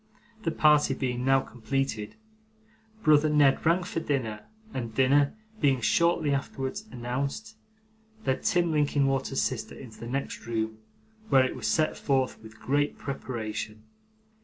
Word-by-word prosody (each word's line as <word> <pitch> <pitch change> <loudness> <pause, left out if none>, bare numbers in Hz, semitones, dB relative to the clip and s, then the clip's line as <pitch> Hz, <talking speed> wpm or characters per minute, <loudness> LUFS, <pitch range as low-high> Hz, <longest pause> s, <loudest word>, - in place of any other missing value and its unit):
The 165 - 0
party 150 -3 +4
being 125 -2 -2
now 135 0 +4
completed, 120 -3 -3 0.9
brother 155 0 +5
Ned 145 -3 +4
rang 170 +3 +3
for 175 - -3
dinner, 115 -9 -2 0.3
and, 115 -3 -4
dinner 140 +4 +3 0.2
being 135 -4 +3
shortly 150 +6 +2
afterwards 140 +8 -3
announced, 135 - -4 0.7
led 130 - 0
Tim 175 -2 +2
Linkinwater's 140 -3 +1
sister 130 -3 -3
into 110 -5 -11
the 115 - -7
next 130 -3 -4
room, 110 -1 -2 0.5
where 130 -1 +6
it - - -3
was - - -3
set 155 -1 +2
forth 135 -4 0
with 110 0 -13
great 145 +2 0
preparation. 110 -5 -5
135 Hz, 135 wpm, -28 LUFS, 120-145 Hz, 0.9 s, where